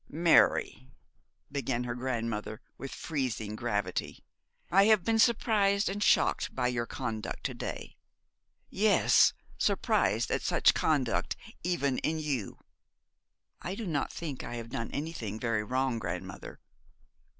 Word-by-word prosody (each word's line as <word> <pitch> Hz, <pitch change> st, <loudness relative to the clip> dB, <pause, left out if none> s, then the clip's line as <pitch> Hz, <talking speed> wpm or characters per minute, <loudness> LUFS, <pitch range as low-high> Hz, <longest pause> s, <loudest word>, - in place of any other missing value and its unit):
'Mary,' 160 Hz, -, +3 dB, 0.6 s
began 130 Hz, -3 st, -1 dB
her 120 Hz, -1 st, -3 dB
grandmother, 115 Hz, -3 st, -3 dB, 0.2 s
with 135 Hz, -, -7 dB
freezing 125 Hz, -9 st, -3 dB
gravity, 110 Hz, -3 st, -3 dB, 0.5 s
'I 195 Hz, +2 st, +6 dB
have 215 Hz, -4 st, +5 dB
been 225 Hz, +2 st, +1 dB
surprised 210 Hz, -3 st, +3 dB
and 200 Hz, +2 st, -4 dB
shocked -, -, +2 dB
by 125 Hz, -, +1 dB
your 120 Hz, -2 st, -2 dB
conduct 110 Hz, -4 st, -4 dB
to -, -, -2 dB
day. -, -, -6 dB, 0.7 s
Yes, -, -, +4 dB, 0.3 s
surprised -, -, +1 dB
at -, -, 0 dB
such -, -, +4 dB
conduct 140 Hz, -7 st, 0 dB, 0.3 s
even 140 Hz, -7 st, 0 dB
in 160 Hz, +1 st, -1 dB
you.' 145 Hz, -9 st, -3 dB, 1.0 s
'I 180 Hz, +3 st, -4 dB
do 225 Hz, -, -5 dB
not 155 Hz, -6 st, -1 dB
think 150 Hz, -6 st, -5 dB
I 120 Hz, -, -6 dB
have 115 Hz, -1 st, -6 dB
done 115 Hz, -2 st, -4 dB
anything 140 Hz, -9 st, -4 dB
very 115 Hz, -3 st, 0 dB
wrong, 130 Hz, +1 st, 0 dB
grandmother.' 90 Hz, -4 st, -6 dB
130 Hz, 130 wpm, -30 LUFS, 115-170 Hz, 1.0 s, I